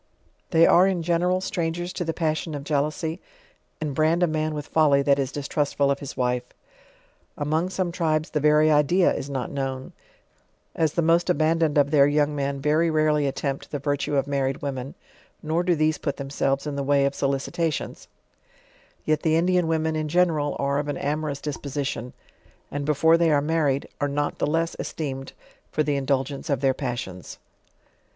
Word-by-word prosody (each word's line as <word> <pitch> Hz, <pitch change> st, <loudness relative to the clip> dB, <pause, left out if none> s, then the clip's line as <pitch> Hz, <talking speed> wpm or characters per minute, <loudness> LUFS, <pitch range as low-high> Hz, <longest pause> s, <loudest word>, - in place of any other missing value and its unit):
They 165 Hz, -1 st, +5 dB
are, 180 Hz, +2 st, +6 dB
in 185 Hz, -3 st, -1 dB
genera), 175 Hz, +2 st, +1 dB
strangers 175 Hz, 0 st, -3 dB
to -, -, -3 dB
the 165 Hz, -, -1 dB
passion 160 Hz, -1 st, -2 dB
of 140 Hz, -, -5 dB
jealousy, 155 Hz, +3 st, -1 dB, 0.6 s
and 155 Hz, -3 st, -3 dB
brand 160 Hz, +4 st, +2 dB
a -, -, +4 dB
man 155 Hz, -1 st, -1 dB
with 150 Hz, -1 st, -5 dB
folly 145 Hz, -3 st, +3 dB
that 140 Hz, 0 st, +3 dB
is 135 Hz, -1 st, -1 dB
distrustful 145 Hz, -1 st, 0 dB
of 140 Hz, -, -1 dB
his 140 Hz, -, -8 dB
wife. 125 Hz, -1 st, +1 dB, 1.0 s
Among 155 Hz, +4 st, 0 dB
some 185 Hz, -2 st, -2 dB
tribes 155 Hz, -3 st, -1 dB
the 150 Hz, -, 0 dB
very 150 Hz, +1 st, +4 dB
idea 155 Hz, +5 st, +3 dB
is 140 Hz, -, -5 dB
not 130 Hz, -3 st, -3 dB
known; 135 Hz, -1 st, -4 dB, 0.8 s
ae 160 Hz, -, +2 dB
the 165 Hz, +3 st, -1 dB
most 170 Hz, +2 st, +3 dB
abandoned 160 Hz, -2 st, +2 dB
of 145 Hz, 0 st, +3 dB
their 140 Hz, -2 st, +6 dB
young 145 Hz, 0 st, +1 dB
men 140 Hz, -1 st, -2 dB
very 155 Hz, +4 st, +2 dB
rarely 155 Hz, -2 st, +2 dB
attempt 135 Hz, 0 st, -3 dB
the 145 Hz, -, -3 dB
vif 145 Hz, 0 st, -1 dB
tue 145 Hz, -, -2 dB
of 135 Hz, -, +1 dB
married 135 Hz, -1 st, -2 dB
women, 135 Hz, -1 st, -4 dB, 0.5 s
nor 160 Hz, +2 st, 0 dB
do 175 Hz, -1 st, +2 dB
these 155 Hz, 0 st, +1 dB
put 140 Hz, -, -3 dB
themselves 135 Hz, 0 st, -1 dB
in 145 Hz, -1 st, -3 dB
the 140 Hz, -, -2 dB
wiy 140 Hz, 0 st, +3 dB
of 140 Hz, -, 0 dB
BO 140 Hz, 0 st, +1 dB
icitation^; 160 Hz, +3 st, -3 dB, 1.0 s
yet, 155 Hz, -1 st, +1 dB
the 160 Hz, -1 st, +2 dB
Indian 180 Hz, +1 st, +2 dB
women 160 Hz, 0 st, 0 dB
in 155 Hz, -1 st, -2 dB
general, 155 Hz, -3 st, +1 dB
are 140 Hz, 0 st, 0 dB
of 145 Hz, -, -3 dB
an 145 Hz, -, -2 dB
amorou? 150 Hz, -1 st, -2 dB
disposition; 140 Hz, -4 st, -4 dB, 0.6 s
and 145 Hz, -1 st, -3 dB
before 160 Hz, +3 st, +4 dB
they 170 Hz, -1 st, +3 dB
are 150 Hz, -2 st, +4 dB
married 145 Hz, -2 st, +1 dB
i2 -, -, -13 dB
JOURNAL -, -, -20 dB
OF 145 Hz, -, -2 dB
are -, -, -5 dB
not 145 Hz, 0 st, -1 dB
the -, -, +1 dB
lees 165 Hz, +2 st, 0 dB
esteemed 135 Hz, -4 st, -5 dB, 0.4 s
for 155 Hz, -, +1 dB
the 145 Hz, -1 st, 0 dB
indulgence 135 Hz, +1 st, -1 dB
of 140 Hz, -3 st, 0 dB
their 135 Hz, -1 st, +3 dB
pas 125 Hz, -3 st, -3 dB
sions. 90 Hz, -1 st, -8 dB
150 Hz, 190 wpm, -24 LUFS, 140-160 Hz, 1.0 s, are